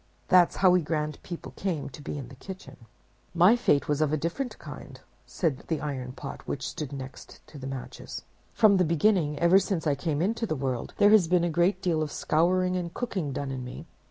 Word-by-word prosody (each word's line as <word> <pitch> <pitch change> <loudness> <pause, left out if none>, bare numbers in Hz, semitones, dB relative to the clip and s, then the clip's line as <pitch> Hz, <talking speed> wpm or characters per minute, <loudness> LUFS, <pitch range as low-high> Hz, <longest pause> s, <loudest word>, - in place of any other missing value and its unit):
That's 180 -2 +5
how 185 -1 +5
we 180 0 +4
grand 150 -1 -2
people 175 -2 -7
came 165 -8 -2
to 145 - -11
be 145 - -5
in 130 -4 -7
the 135 - -12
kitchen.' 185 - -11 0.5
"'My 180 +7 +6
fate 150 -12 +2
was 150 0 0
of 155 0 +1
different 205 - -3
kind,' - - -10 0.3
said 155 -7 -1
the 160 - -1
Iron 130 -4 -4
Pot, - - -7
which - - -3
stood 145 -3 -5
next 130 -1 -9
to 150 - -12
the 135 - -6
Matches. 135 -2 -7 0.3
'From 205 -3 +5
the 185 - +4
beginning, 165 -2 +2
ever 170 +4 +5
since 190 -4 -2
I 150 - +3
came 145 +1 -2
into 225 +6 0
the 155 - -1
world, 130 -3 -3
there 205 0 +6
has 210 -6 +6
been 175 0 +3
a 175 - 0
great 175 +4 +1
deal 165 -4 +1
of 150 -2 -2
scouring 180 +3 +1
and 175 -2 -3
cooking 185 - -3
done 140 0 -3
in 130 -1 -4
me. 125 - -8
165 Hz, 215 wpm, -27 LUFS, 145-185 Hz, 0.5 s, My